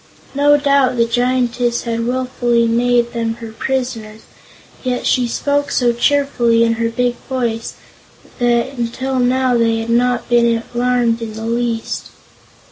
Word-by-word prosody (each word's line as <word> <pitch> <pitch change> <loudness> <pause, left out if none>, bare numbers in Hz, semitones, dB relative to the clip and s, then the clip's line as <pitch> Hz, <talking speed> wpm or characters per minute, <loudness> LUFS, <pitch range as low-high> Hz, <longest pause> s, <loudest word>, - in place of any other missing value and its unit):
No 290 +1 +4
doubt 280 -3 +2
the 230 - +3
Giantess 245 0 0
had 230 -1 -2
wilfully 245 -2 0
made 240 +1 +1
them 230 -1 -2
her 230 -1 -9
prisoners; 225 -3 -4 0.6
yet 250 -1 -2
she 250 -2 +2
spoke 285 +4 -1
so 240 -2 +2
cheerfully, 240 -3 +2
in 230 0 +2
her 230 - +1
big 245 +1 -1
voice, 235 -3 -2 0.6
that 240 +2 +1
until 255 +3 -2
now 250 0 +2
they 230 -1 +2
had 225 +1 -3
not 245 0 +1
been 235 -1 +2
alarmed 240 -1 +1
in 220 -1 -5
the 220 +1 -6
least. 235 -1 -2
240 Hz, 140 wpm, -17 LUFS, 230-255 Hz, 0.6 s, No